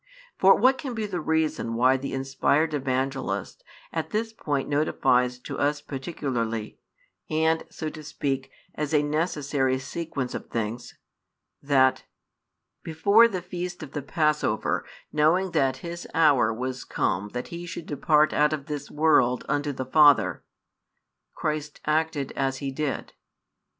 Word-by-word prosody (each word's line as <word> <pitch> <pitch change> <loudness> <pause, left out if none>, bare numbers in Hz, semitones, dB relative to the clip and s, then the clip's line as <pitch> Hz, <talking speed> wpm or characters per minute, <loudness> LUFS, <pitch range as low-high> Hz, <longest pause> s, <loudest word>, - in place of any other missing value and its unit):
For 190 +1 +7
what 260 +4 +3
can 255 -4 -5
be 220 -1 -2
the 180 -5 -3
reason 155 -7 0
why 130 +3 +4
the 135 +1 -4
inspired 140 +4 +1
Evangelist 135 - -2 0.3
at - - -2
this 225 +1 -2
point 145 -9 -2
notifies 130 -4 +2
to - - -6
us 145 +1 +1
particularly, 130 -7 -4 0.5
and 160 +1 +2
(so 155 - -5
to 155 - -9
speak) 135 -3 -3 0.2
as 150 0 -2
a 150 - +4
necessary 145 -4 0
sequence 135 -1 -4
of - - -6
things, 115 +1 -4 0.6
that: 135 -2 +3 0.8
Before 200 +8 +5
the 185 -6 -4
feast 180 -1 -5
of 140 - -9
the 145 - -4
passover, 150 +2 0 0.3
knowing 165 +5 +3
that 135 -5 +1
His 170 0 -6
hour 145 -8 +4
was 130 +3 -4
come 100 +3 -1
that 125 0 -4
He 170 +1 -7
should 170 -1 -6
depart 150 +1 +2
out 150 +1 +3
of 145 -3 -4
this 145 -1 -5
world 145 -5 +3
unto 145 0 0
the 130 -1 -5
Father, 145 +1 +5 0.9
Christ 150 -1 -3
acted 155 -2 0
as 135 -1 -1
He 135 0 -4
did? 140 0 -3
145 Hz, 140 wpm, -26 LUFS, 130-160 Hz, 0.9 s, For